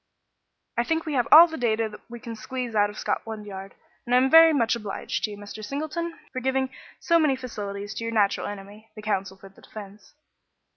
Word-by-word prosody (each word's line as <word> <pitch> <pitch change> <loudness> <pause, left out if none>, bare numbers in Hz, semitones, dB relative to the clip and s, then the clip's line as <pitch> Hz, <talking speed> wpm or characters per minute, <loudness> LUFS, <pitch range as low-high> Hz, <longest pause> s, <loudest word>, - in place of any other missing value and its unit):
"I - - +3
think 325 +5 -1
we 310 - -3
have 250 -3 +1
all 325 +3 +11
the 320 -3 -7
data 225 -2 +1
that 210 -1 -11
we 240 0 -8
can 230 -1 -7
squeeze 250 +1 -5
out 205 -1 +3
of 205 - -11
Scotland 220 -2 -3
Yard, 195 -1 -9 0.3
and 245 - +2
I - - +7
am 260 +1 +3
very 325 0 +9
much 235 -6 +2
obliged 210 -4 -4
to - - -5
you, 205 - -8
Mr. 205 +1 -9
Singleton, 315 +7 -4 0.2
for 255 - -2
giving 265 0 0 0.3
so 335 -1 +3
many 300 -4 +3
facilities 205 -5 -6
to 230 - -5
your 230 - -3
natural 205 -3 +1
enemy, 205 +2 -10
the 215 - -10
counsel 195 -2 -2
for 195 - -13
the 195 - -21
defence." 210 +3 -12
225 Hz, 215 wpm, -25 LUFS, 205-265 Hz, 0.3 s, all